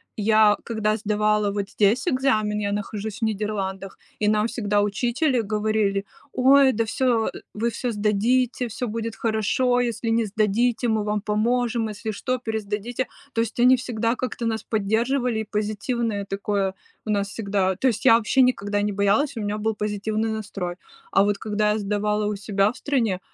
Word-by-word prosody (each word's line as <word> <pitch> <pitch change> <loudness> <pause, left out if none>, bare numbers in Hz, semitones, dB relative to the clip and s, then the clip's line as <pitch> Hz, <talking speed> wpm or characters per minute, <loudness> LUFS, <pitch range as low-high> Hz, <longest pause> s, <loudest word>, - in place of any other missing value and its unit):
я 215 0 +4
когда 215 -2 0
сдавала 210 -1 +1
вот 200 0 -3
здесь 220 - +2
экзамен, 220 -8 +1
я 200 -1 -1
нахожусь 210 +1 -4
в - - -24
Нидерландах, 195 -3 -3 0.2
и 210 - +1
нам 210 0 +3
всегда 210 -3 0
учители 240 +6 +1
говорили: 210 -2 0 0.3
"Ой, 270 +1 +5
да 230 -1 0
всё, 230 0 +1
э - - -8 0.2
вы 235 +3 0
всё 245 +2 -3
сдадите, 230 +4 +1
всё 235 +2 -4
будет 225 0 -4
хорошо, 230 +3 +1
если 235 -1 -1
не 225 0 +2
сдадите, 220 +4 +1
мы 220 -2 +1
вам 210 0 -1
поможем, 230 +2 0
если 215 +1 -5
что, 255 +4 -2
пересдадите". 220 +1 -3 0.3
То 225 - +1
есть 230 +1 -4
они 250 +2 +7
всегда 235 -2 -1
как-то 250 -2 -4
нас 225 -1 -1
поддерживали, 230 +3 0
и 220 - -4
позитивное 215 0 -2
такое 195 -1 -1 0.3
у - - -6
нас 200 -1 0
всегда. 195 -3 -1
То 260 +8 +1
есть 235 - -1
я 225 - +8
вообще 235 +4 +2
никогда 205 -5 +1
не 210 - 0
боялась, 205 +9 +1
у 225 - -4
меня 205 0 -2
был 220 +1 -1
позитивный 215 +1 -2
настрой. 195 -5 -4 0.4
А - - +4
вот 205 0 +1
когда 210 0 0
я 210 - 0
сдавала 210 +1 0
у 210 - -1
себя 200 0 +1
в - - -13
стране, 230 -10 0
215 Hz, 175 wpm, -24 LUFS, 205-235 Hz, 0.4 s, я